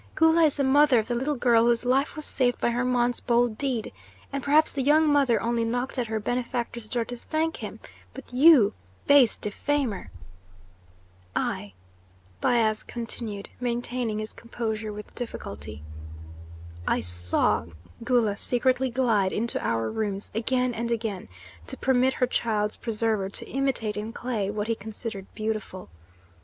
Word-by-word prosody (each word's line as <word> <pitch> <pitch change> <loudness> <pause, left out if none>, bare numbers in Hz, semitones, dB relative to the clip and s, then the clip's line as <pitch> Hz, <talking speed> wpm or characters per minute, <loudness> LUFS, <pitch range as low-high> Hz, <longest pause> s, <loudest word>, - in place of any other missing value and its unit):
Gula 320 0 +5
is 300 - +2
the 280 - +1
mother 280 0 +5
of 220 - +1
the - - +1
little 265 +5 -1
girl 235 -2 +4
whose 240 0 +2
life 265 +4 +1
was 305 -1 -4
saved 245 -2 0
by - - +1
Hermon's 245 0 +1
bold 240 -2 +2
deed, 250 - -2 0.4
and 275 - -1
perhaps 305 +2 +4
the 275 - -2
young 305 +4 +4
mother 275 -6 +3
only 235 +3 0
knocked 245 +3 -2
at 240 - -1
her 220 0 -2
benefactor's 235 0 -3
door 235 -2 -1
to 245 - -6
thank 315 +6 -2
him; - - -7 0.4
but 270 -2 -11
you, 265 -5 +7 0.3
base 280 -5 +6
defamer 245 +1 -2 0.7
" 90 0 -31 0.2
"I," 100 -2 -9 0.7
Bias 220 -3 +2
continued, 225 -3 -6
maintaining 240 -2 -2
his 215 0 -5
composure 220 -2 -4
with 210 0 -9
difficulty, 75 - -7 1.0
"I - - +2
saw 90 -2 +1 0.4
Gula 230 -4 +2
secretly 255 +3 +1
glide 230 -6 +2
into 235 +2 +1
our 115 -1 0
rooms 205 - -3
again 250 +2 0
and 235 +1 -3
again 220 - -3 0.4
to - - -3
permit 260 0 +2
her 250 - +1
child's 215 -4 0
preserver 220 -3 -1
to - - -6
imitate 265 -6 -1
in 215 +2 -4
clay 230 -6 -2
what 210 0 -2
he 230 - +1
considered 220 -1 -6
beautiful. 215 - -4
235 Hz, 150 wpm, -26 LUFS, 215-255 Hz, 1.0 s, you